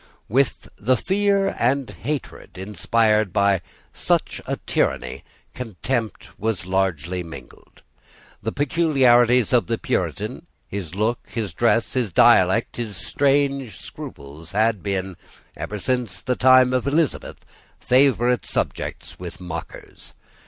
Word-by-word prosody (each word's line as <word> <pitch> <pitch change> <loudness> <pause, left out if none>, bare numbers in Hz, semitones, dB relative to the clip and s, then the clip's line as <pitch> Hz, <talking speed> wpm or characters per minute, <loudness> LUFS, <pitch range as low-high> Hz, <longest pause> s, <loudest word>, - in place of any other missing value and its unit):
With 130 +5 +1
the 125 +5 +2
fear 195 - +1
and 135 +2 +1
hatred 145 -6 -6
inspired 105 +2 +1
by 100 -1 +2 0.3
such - - 0
a - - -1
tyranny - - -1 0.3
contempt 115 0 -4
was 110 -5 -2
largely 90 -2 -1
mingled. 85 -2 -12 0.6
The - - -2
peculiarities 130 -6 +3
of 120 - +3
the 115 - 0
Puritan, - - -3 0.2
his 95 -4 -6
look, 110 +4 0
his 105 -7 -4
dress, 115 +4 +1
his 125 -6 -1
dialect, - - +4
his 115 -4 -4
strange 140 -3 0
scruples, 75 +5 -10
had 110 -1 +2
been, 95 -2 -3 0.4
ever 105 - -5
since 115 -4 -2
the 125 - 0
time 130 0 +5
of 130 +1 0
Elizabeth, 150 +2 -1 0.3
favourite 125 -2 +3
subjects - - -4
with 90 0 -8
mockers. 85 -3 -9
115 Hz, 115 wpm, -22 LUFS, 95-130 Hz, 0.6 s, time